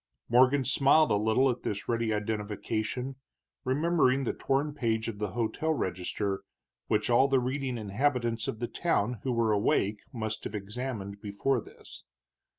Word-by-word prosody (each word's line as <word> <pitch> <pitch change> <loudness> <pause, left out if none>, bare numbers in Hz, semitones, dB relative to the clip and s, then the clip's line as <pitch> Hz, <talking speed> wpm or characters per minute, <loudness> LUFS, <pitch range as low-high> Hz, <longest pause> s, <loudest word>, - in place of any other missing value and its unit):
Morgan 130 +3 +5
smiled 140 +4 +4
a - - +4
little 110 +6 +3
at 125 - -6
this 105 -1 -4
ready 115 -1 0
identification, 110 +4 -2 0.5
remembering 140 -1 +2
the 120 - -1
torn 140 +2 0
page 115 -5 -1
of 110 -3 -5
the 105 -3 -3
hotel 120 +7 0
register, 95 -1 -2 0.5
which 105 +3 +1
all 130 +3 +5
the 135 -1 +3
reading 130 0 -2
inhabitants 115 +2 0
of - - -3
the 120 +1 -3
town 120 -9 0
who 130 - -1
were 115 -2 +2
awake 105 0 +1
must 110 -2 -4
have 105 - -4
examined 105 -1 -5
before 110 +5 0
this. - - -13
115 Hz, 155 wpm, -29 LUFS, 105-135 Hz, 0.5 s, Morgan